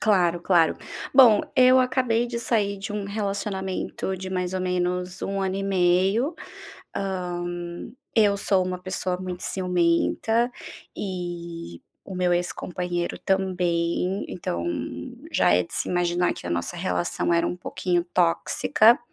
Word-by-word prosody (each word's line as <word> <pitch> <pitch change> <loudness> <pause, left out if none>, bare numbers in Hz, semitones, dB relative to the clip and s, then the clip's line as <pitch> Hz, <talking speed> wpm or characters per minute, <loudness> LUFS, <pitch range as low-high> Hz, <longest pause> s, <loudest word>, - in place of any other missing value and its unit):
Claro, 175 -5 +3
claro. 170 -4 +3 0.4
Bom, 245 -6 +8 0.2
eu 255 0 +7
acabei 250 -2 +1
de 235 -1 -3
sair 205 -4 0
de 200 +2 -5
um 210 -1 -3
relacionamento 195 -2 -3
de 190 0 -6
mais 180 0 -2
ou 185 - -1
menos 180 0 -1
1 195 0 -1
ano 190 0 -1
e 195 - -2
meio. 195 - +2 0.6
Hã, 180 -3 -2 0.7
eu 205 -2 +4
sou 195 -2 +2
uma 180 0 -3
pessoa 185 0 -2
muito 180 -1 -5
ciumenta 185 +6 +1 0.4
e 170 - -5 0.2
o 190 - -8
meu 180 -1 +1
ex-companheiro 175 0 -2
também. 180 -1 0
Então 85 - -3 0.7
já - - +4
é 90 0 +3
de - - -9
se - - -1
imaginar 175 0 +1
que - - -9
a - - -3
nossa 85 0 -2
relação 90 - -1
era 170 0 +3
um 180 - -2
pouquinho 180 -1 -1
tóxica. 185 +6 +4
185 Hz, 140 wpm, -25 LUFS, 175-200 Hz, 0.7 s, Bom